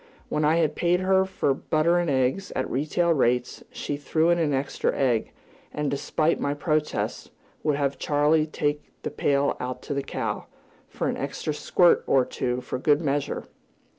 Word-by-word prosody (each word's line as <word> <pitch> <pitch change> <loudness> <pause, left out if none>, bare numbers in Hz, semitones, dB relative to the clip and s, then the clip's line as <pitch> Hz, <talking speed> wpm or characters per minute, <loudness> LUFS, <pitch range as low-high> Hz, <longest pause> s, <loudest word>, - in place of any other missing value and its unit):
When 150 - 0
I 155 +2 +4
had 160 -3 +2
paid 175 +1 +2
her 190 0 +3
for 190 -7 0
butter 155 +5 +1
and 175 -2 0
eggs, 135 +8 +1
at 130 - -1
retail 155 +5 +1
rates, 125 -3 0
she 145 - -4
threw 160 +4 +1
in 170 - +2
an 155 -3 +1
extra 135 0 0
egg, 120 -5 +1 0.4
and, 150 -2 -2
despite 155 +3 0
my 140 0 -1
protests, 150 +1 -1 0.3
would 150 -2 +1
have 140 -1 -1
Charley 150 +1 +2
take 145 -1 -2
the - - -3
pail 140 -1 +1
out 125 0 -5
to 145 - -4
the 140 - -1
cow, - - -4 0.4
"for - - -3
an - - -1
extra 155 - -3
squirt 175 +3 +3
or 130 -2 +4
two, 125 0 -2
for 125 - -4
good 145 +2 +3
measure!" 145 -3 -1
145 Hz, 175 wpm, -25 LUFS, 135-160 Hz, 0.4 s, I